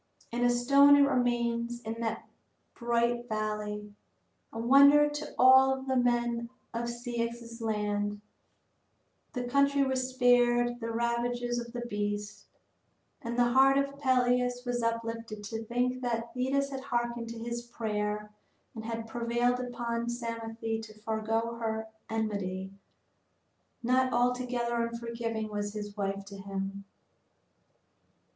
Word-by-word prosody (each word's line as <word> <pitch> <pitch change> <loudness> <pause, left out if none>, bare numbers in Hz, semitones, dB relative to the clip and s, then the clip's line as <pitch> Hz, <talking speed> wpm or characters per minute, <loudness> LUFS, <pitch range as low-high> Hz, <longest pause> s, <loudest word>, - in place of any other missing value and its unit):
And 240 +1 -1
a 245 - +5
stone 275 +4 +6
it 285 0 +6
remains 240 -2 0
in 225 0 -5
that 225 -1 -3 0.5
bright 235 0 0
valley, 210 -1 -3 0.6
a - - -8
wonder 280 +5 +7
to 295 +1 -6
all 265 +1 +6
the 265 0 -1
men 240 -1 +1 0.2
of 235 +1 -2
Ceyx's 235 -1 -4
land. 205 -1 -1 1.1
The 250 -2 -2
country 280 +3 +3
was 260 -1 0
spared 240 -1 +3
the 230 -1 -4
ravages 240 +1 -1
of 235 0 -7
the 240 0 -5
beast. 205 -1 -4 0.7
And 235 +1 -4
the 240 0 +3
heart 270 +2 +6
of 280 0 -1
Peleus 250 -2 +2
was 245 -1 -1
uplifted 230 -2 -3
to 225 +2 -5
think 250 +2 0
that 230 -1 -2
Thetis 275 +2 0
had 270 -1 -4
harkened 240 -3 -2
to 230 - -7
his 235 +1 -4
prayer 210 -3 -3 0.4
and 220 - -7
had 225 0 -4
prevailed 240 +2 0
upon 235 -1 -3
Psamathe 230 -1 -4
to 215 -1 -12
forego 225 +2 -1
her 220 -1 -2 0.2
enmity. 200 -4 -2 1.1
Not 255 +2 +3
altogether 245 -1 0
unforgiving 230 -1 -3
was 205 0 -3
his 205 -1 -6
wife 195 -1 -2
to 200 0 -10
him. 195 0 -5
235 Hz, 125 wpm, -30 LUFS, 225-245 Hz, 1.1 s, wonder